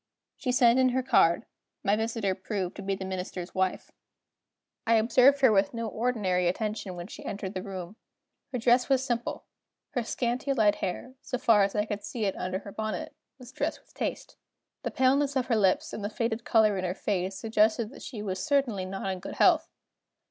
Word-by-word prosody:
She 255 - -2
sent 245 -1 +5
in 260 0 +5
her 260 - +1
card. 170 -9 +4 0.4
My 200 - +3
visitor 220 -3 -1
proved 190 -1 -4
to - - -6
be 195 0 -1
the 190 - -6
Minister's 185 -1 -5
wife. 190 -1 -1 1.0
I 230 - +5
observed 250 +5 +5
her 260 -4 +6
with 200 +2 +2
no 230 -1 -2
ordinary 210 -6 0
attention 210 0 -2
when 175 0 -6
she 200 - -10
entered 195 -1 -5
the 185 - -3
room. 190 +1 -7 0.5
Her 255 - -1
dress 245 +2 +3
was 265 -1 +3
simple; 240 -2 -2 0.5
her 245 - -1
scanty 245 +4 -1
light 215 -5 +3
hair, 250 +8 -4
so 250 - -3
far 230 -4 +4
as 195 +1 -1
I 210 0 +1
could 205 -1 -4
see 215 +1 -3
it 195 - 0
under 185 +1 -2
her 200 +1 -9
bonnet, 215 +1 -4 0.2
was 250 -1 -12
dressed - - -2
with - - -28
taste. - - -4 0.4
The - - -2
paleness 275 +2 +2
of 260 -2 +1
her 240 - +1
lips, 195 -4 +2
and 210 - -5
the 205 - -1
faded 230 +1 -2
color 215 -5 +3
in - - -3
her 180 0 -2
face, 190 -1 -2
suggested 220 +1 +2
that - - -12
she 215 -6 -6
was 190 -2 -3
certainly 270 -10 +1
not 195 +1 -3
in 185 - -4
good - - -7
health. - - +4
215 Hz, 200 wpm, -28 LUFS, 190-245 Hz, 1.0 s, her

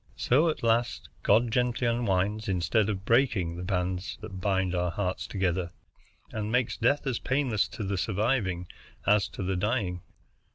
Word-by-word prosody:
So 150 +7 +3
at 155 - -3
last 115 +1 +1
God 115 +3 +3
gently 125 +1 +1
unwinds 105 -3 0
instead 95 +4 +1
of 95 -2 -3
breaking 110 -9 +2
the 85 - -6
bands 90 0 -2
that 100 -4 -7
bind 95 -2 +1
our 90 0 0
hearts 100 +4 -2
together, 95 -3 -1 0.6
and 110 0 -3
makes 125 -1 +1
death 140 +6 +1
as 130 -4 -1
painless 130 -7 +1
to 110 - -6
the 100 -1 -1
surviving 100 -4 0 0.4
as 105 -1 +4
to - - -6
the 95 +1 -1
dying. 95 -2 -1
105 Hz, 160 wpm, -28 LUFS, 95-115 Hz, 0.6 s, as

